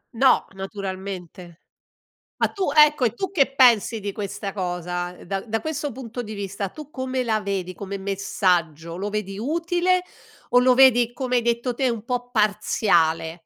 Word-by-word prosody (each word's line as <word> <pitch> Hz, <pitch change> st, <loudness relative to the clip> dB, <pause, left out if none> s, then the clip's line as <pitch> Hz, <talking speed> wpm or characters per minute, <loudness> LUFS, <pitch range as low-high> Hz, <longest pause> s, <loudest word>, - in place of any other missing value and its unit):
No, 260 Hz, +2 st, +4 dB
naturalmente. 190 Hz, -3 st, -7 dB, 0.8 s
Ma -, -, +1 dB
tu 390 Hz, -2 st, -2 dB
ecco, 300 Hz, -3 st, +6 dB
e 225 Hz, -, -2 dB
tu, 385 Hz, +8 st, -3 dB
che 275 Hz, -7 st, +2 dB
pensi 235 Hz, -4 st, +4 dB
di 200 Hz, 0 st, -4 dB
questa 200 Hz, -1 st, -5 dB
cosa? 175 Hz, -1 st, -3 dB
Da 195 Hz, +2 st, -3 dB
da 225 Hz, +1 st, -3 dB
questo 300 Hz, -2 st, -3 dB
punto 245 Hz, 0 st, -6 dB
di 215 Hz, -2 st, -7 dB
vista, 200 Hz, 0 st, -4 dB
tu 300 Hz, +6 st, -11 dB
come 260 Hz, -1 st, -2 dB
la 220 Hz, -2 st, +1 dB
vedi 195 Hz, -3 st, -3 dB
come 200 Hz, +1 st, -6 dB
messaggio, 180 Hz, -4 st, -1 dB
lo 200 Hz, +2 st, -3 dB
vedi 200 Hz, -2 st, -4 dB
utile, 345 Hz, -, +1 dB, 0.5 s
o 245 Hz, -, +5 dB
lo 250 Hz, 0 st, +5 dB
vedi, 245 Hz, -2 st, +5 dB
come 250 Hz, 0 st, -1 dB
hai 240 Hz, -, +2 dB
detto 235 Hz, +1 st, 0 dB
te, 260 Hz, +1 st, +1 dB
un 230 Hz, -3 st, -3 dB
po' 245 Hz, 0 st, -3 dB
parziale? 175 Hz, -7 st, +1 dB
215 Hz, 165 wpm, -23 LUFS, 190-255 Hz, 0.8 s, ecco